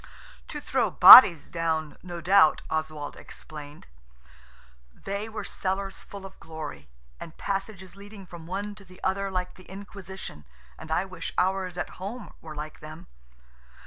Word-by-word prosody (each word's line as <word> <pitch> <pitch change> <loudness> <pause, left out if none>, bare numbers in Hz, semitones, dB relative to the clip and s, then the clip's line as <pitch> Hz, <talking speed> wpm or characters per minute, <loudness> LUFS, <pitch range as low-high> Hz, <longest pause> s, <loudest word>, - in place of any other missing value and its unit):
"To - - -6
throw - - 0
bodies 170 - +10
down, 160 -3 -2
no 175 -2 -8
doubt," 175 -2 +4
Oswald 155 -2 -4
explained. 150 -1 -11 1.1
They 200 - -6
were 220 - -6
cellars 195 0 -3
full 200 -1 -11
of 190 - -13
glory, 150 - -9 0.3
and 165 - -10
passages 195 -2 -5
leading 200 0 -12
from 170 -2 -12
one 205 +3 -4
to 205 -1 -15
the 185 -1 -17
other 195 +1 -1
like 180 -1 -3
the 185 - -17
Inquisition, 190 - -9 0.3
and 160 - -11
I 160 +4 0
wish 185 -3 -7
ours 185 -1 0
at 180 - -6
home 220 +6 -7
were 155 -2 -9
like 150 +1 -7
them. 155 +2 -11
185 Hz, 145 wpm, -26 LUFS, 160-195 Hz, 1.1 s, bodies